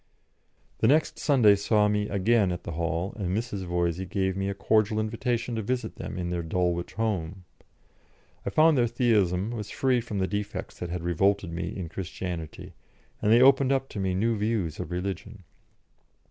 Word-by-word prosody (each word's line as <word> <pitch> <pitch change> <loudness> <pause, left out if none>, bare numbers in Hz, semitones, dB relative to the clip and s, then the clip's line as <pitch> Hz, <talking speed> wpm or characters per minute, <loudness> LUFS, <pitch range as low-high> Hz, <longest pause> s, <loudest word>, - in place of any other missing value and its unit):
The - - +3
next 155 +5 +2
Sunday 125 -8 +5
saw 105 +1 +2
me 105 0 0
again 100 0 +2
at 90 - -5
the - - -5
Hall, 85 +3 -2
and 95 -2 -1
Mrs. 105 -5 -4
Voysey 85 +1 -1
gave 95 0 0
me 95 0 -1
a 100 - -3
cordial 110 +1 +2
invitation 115 +2 -2
to 115 - -2
visit 120 +1 -3
them - - -6
in 90 -1 -3
their 85 -1 -1
Dulwich 85 +1 -1
home. 95 -5 -2 1.0
I - - -2
found 155 -3 +4
their 120 - +3
Theism 110 -5 +1
was 105 -4 -5
free 130 0 +1
from 110 -3 -5
the 95 - +1
defects 105 -1 -4
that 90 - -4
had 85 0 -4
revolted 90 +1 +1
me 85 +2 -3
in 90 -3 -4
Christianity, 85 -1 -6 0.5
and 105 - +2
they 120 +2 +7
opened 135 0 +5
up 135 0 0
to 105 - -6
me 95 -1 0
new 115 +4 +1
views 105 -7 -1
of 90 - -5
religion. 95 +3 -5
100 Hz, 180 wpm, -27 LUFS, 90-115 Hz, 1.0 s, they